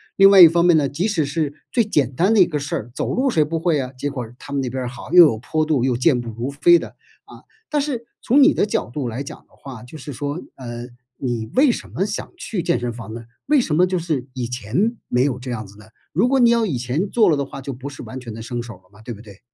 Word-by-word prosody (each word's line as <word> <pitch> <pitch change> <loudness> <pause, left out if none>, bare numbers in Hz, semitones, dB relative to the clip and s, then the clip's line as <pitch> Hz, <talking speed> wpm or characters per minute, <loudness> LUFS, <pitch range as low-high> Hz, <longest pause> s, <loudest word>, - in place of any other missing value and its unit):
另 195 0 +7
外 195 -2 +8
一 170 - +12
方 170 +1 +2
面 175 -2 +5
呢， 145 -3 +2
即 165 +10 -1
使 165 -8 0
是 145 0 -2 0.2
最 235 - +3
简 145 - 0
单 190 - +3
的 220 - +4
一 180 - +7
个 150 -4 -3
事 140 - -4
儿， 115 +3 -5
走 - - -2
路 265 +2 +1
谁 155 -9 +3
不 160 +2 -3
会 165 -3 +1
啊， 125 - -6
结 145 +3 -2
果 125 -4 -5
他 140 - -9
们 140 - 0
那 130 - -3
边 130 +1 -4
儿 125 - -3
好， 125 - -10
又 180 -1 +10
有 115 -8 +1
坡 155 +7 -1
度 150 -6 +1
又 125 -2 +1
健 125 -1 +2
步 120 - -7
如 115 +4 -4
飞 155 +5 +5
的， - - -7 0.4
啊。 - - -15 0.3
但 295 -1 +1
是 255 -5 -3 0.2
从 265 +4 +4
你 295 +3 +6
的 - - +1
角 205 - -2
度 130 0 -4
来 125 +5 -4
讲 - - -9
的 - - -26
话， 130 -5 -10
就 125 +6 -11
是 145 0 -8
说， 145 +6 -4
嗯， 120 -1 -7 0.3
你 120 -4 -3
为 275 +2 +5
什 - - -6
么 190 - -1
想 205 - -5
去 210 - -4
健 170 - +1
身 120 0 -3
房 115 -2 -9
呢？ 115 0 -7 0.2
为 295 -1 +4
什 155 -10 -1
么 180 +3 +5
就 185 0 -1
是 155 -7 -2
以 125 -2 -3
前 125 - -1
没 125 +1 +2
有 130 -3 -1
这 125 0 -6
样 110 -3 -4
子 100 - -16
呢？ 105 - -15 0.3
如 195 +10 +3
果 270 +1 +2
你 240 -2 +6
要 235 -1 +3
以 150 -10 -2
前 130 +11 -2
做 220 -6 +3
了 155 - +3
的 140 - -1
话， 135 - -9
就 135 0 -5
不 130 +3 -8
是 140 - -10
完 130 - -7
全 120 -3 -8
的 115 - -8
生 120 +1 -4
手 115 -2 -9
了 90 0 -24
嘛， 105 +2 -18
对 120 +2 -7
不 105 - -12
对？ 100 -3 -15
140 Hz, 315 characters per minute, -21 LUFS, 125-180 Hz, 0.4 s, 一